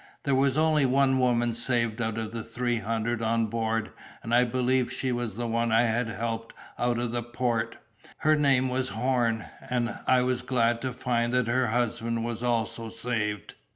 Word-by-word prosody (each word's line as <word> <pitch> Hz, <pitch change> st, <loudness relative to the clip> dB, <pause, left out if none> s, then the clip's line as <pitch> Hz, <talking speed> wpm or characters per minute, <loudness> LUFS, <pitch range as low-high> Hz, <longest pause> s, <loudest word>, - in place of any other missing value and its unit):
There 140 Hz, -, +1 dB
was 135 Hz, +1 st, +2 dB
only 155 Hz, -3 st, +3 dB
one 135 Hz, 0 st, +3 dB
woman 120 Hz, -2 st, +2 dB
saved 115 Hz, -1 st, 0 dB
out 110 Hz, -1 st, -2 dB
of 110 Hz, -1 st, -3 dB
the 115 Hz, 0 st, -4 dB
three 120 Hz, +2 st, -2 dB
hundred 115 Hz, +2 st, -2 dB
on 115 Hz, 0 st, +1 dB
board, 115 Hz, 0 st, -1 dB, 0.3 s
and 115 Hz, -, -3 dB
I 125 Hz, +1 st, +5 dB
believe 125 Hz, +1 st, +1 dB
she 130 Hz, -, -2 dB
was 120 Hz, -4 st, -2 dB
the 120 Hz, +1 st, -3 dB
one 115 Hz, 0 st, 0 dB
I 115 Hz, +2 st, +5 dB
had 120 Hz, +1 st, +1 dB
helped 115 Hz, +1 st, -4 dB, 0.2 s
out 120 Hz, -1 st, +1 dB
of 120 Hz, -1 st, -2 dB
the 120 Hz, 0 st, -1 dB
port; 120 Hz, 0 st, -2 dB, 0.4 s
her 155 Hz, 0 st, +3 dB
name 135 Hz, -3 st, +3 dB
was 130 Hz, 0 st, -1 dB
Horn, 115 Hz, -2 st, 0 dB, 0.2 s
and 120 Hz, -1 st, -1 dB
I 130 Hz, -1 st, +4 dB
was 125 Hz, -1 st, 0 dB
glad 120 Hz, -2 st, +1 dB
to 130 Hz, -, -2 dB
find 120 Hz, -1 st, 0 dB
that 125 Hz, -2 st, +3 dB
her 125 Hz, +2 st, +1 dB
husband 115 Hz, 0 st, -1 dB
was 115 Hz, -1 st, -3 dB
saved -, -, -7 dB
also. 115 Hz, -1 st, -1 dB
120 Hz, 190 wpm, -27 LUFS, 115-125 Hz, 0.4 s, I